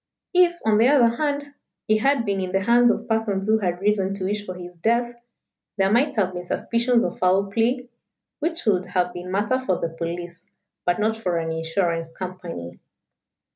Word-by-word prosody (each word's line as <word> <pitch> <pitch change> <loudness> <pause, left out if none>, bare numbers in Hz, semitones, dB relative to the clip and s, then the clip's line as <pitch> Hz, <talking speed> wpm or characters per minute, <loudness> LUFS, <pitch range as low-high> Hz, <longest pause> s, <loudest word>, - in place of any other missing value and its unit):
If, 355 -1 +4
on 215 -1 +4
the 230 - +5
other 245 -5 +4
hand, 285 -1 -2 0.3
he 215 0 +3
had 270 0 +2
been 200 -2 0
in 185 -1 -3
the 195 +1 +1
hands 240 +3 +5
of - - -1
persons 220 -4 0
who 220 0 +3
had 180 -3 -1
reason 200 -1 +1
to 195 - -5
wish 205 +2 -2
for 185 - -5
his 180 0 -9
death, 235 +6 +1 0.6
there 195 0 +2
might 275 +6 +2
have 190 -4 +1
been 175 0 -6
suspicions 235 +3 +1
of - - -3
foul 190 +2 +2
play, 245 +4 0 0.5
which 330 +2 -2
would 185 -4 +2
have 180 -1 0
been 180 0 -7
matter 205 +7 +1
for 185 -8 +1
the 165 - -2
police 170 +1 -6 0.4
but 175 - +3
not 220 +1 +1
for 180 -6 -2
an 165 -1 -2
insurance 165 0 -1
company." 175 - -7
200 Hz, 190 wpm, -23 LUFS, 180-235 Hz, 0.6 s, the